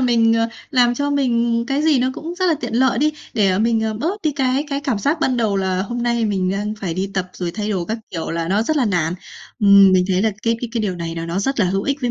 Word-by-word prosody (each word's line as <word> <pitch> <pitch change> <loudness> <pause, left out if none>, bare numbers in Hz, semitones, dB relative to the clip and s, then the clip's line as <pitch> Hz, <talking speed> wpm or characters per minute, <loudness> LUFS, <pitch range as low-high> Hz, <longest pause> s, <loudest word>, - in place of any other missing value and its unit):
mình, 235 -3 +3
ờ, 230 0 +2 0.2
làm 245 -2 +3
cho 285 +3 -1
mình 235 -4 +1
cái 275 +3 0
gì 310 -4 +3
nó 255 +1 +1
cũng 330 +3 -6
rất 370 +1 0
là 335 - +3
tiện 240 -2 -4
lợi 255 -1 +2
đi, 305 +2 +2 0.2
để, 205 -3 +3
ờ, 185 - +1
mình, 225 +1 +2
ờ, 220 0 -1
bớt 345 - -3
đi 310 - +1
cái 265 0 0
cái 280 0 -1
cảm 265 -7 -1
giác 295 +9 0
ban 255 -5 +1
đầu 220 -4 +1
là 190 -1 0
hôm 240 +4 -4
nay 235 -1 +1
mình 190 -3 0
đang 205 +2 -2
phải 175 -4 -3
đi 195 +2 -3
tập 185 -1 -2
rồi 175 -2 -4
thay 210 +3 -4
đồ 185 -4 -1
các 220 +5 -3
kiểu 165 -2 -4
là 165 0 -2
nó 205 +3 +2
rất 310 +6 -1
là 275 - +2
nản. 175 -5 0 0.5
Ừm, 200 -1 +7
mình 185 -1 +4
thấy 185 0 +1
là 220 - +2
cái 230 0 +1
cái 245 - -4
cái 235 - -1
điều 190 -4 -2
này 165 -1 -5
là 165 0 -5
nó 170 +3 -2
rất 260 +4 -1
là 185 - +3
hữu 195 +2 -1
ích 280 +3 -2
với 245 -2 -1
225 Hz, 300 wpm, -20 LUFS, 195-260 Hz, 0.5 s, Ừm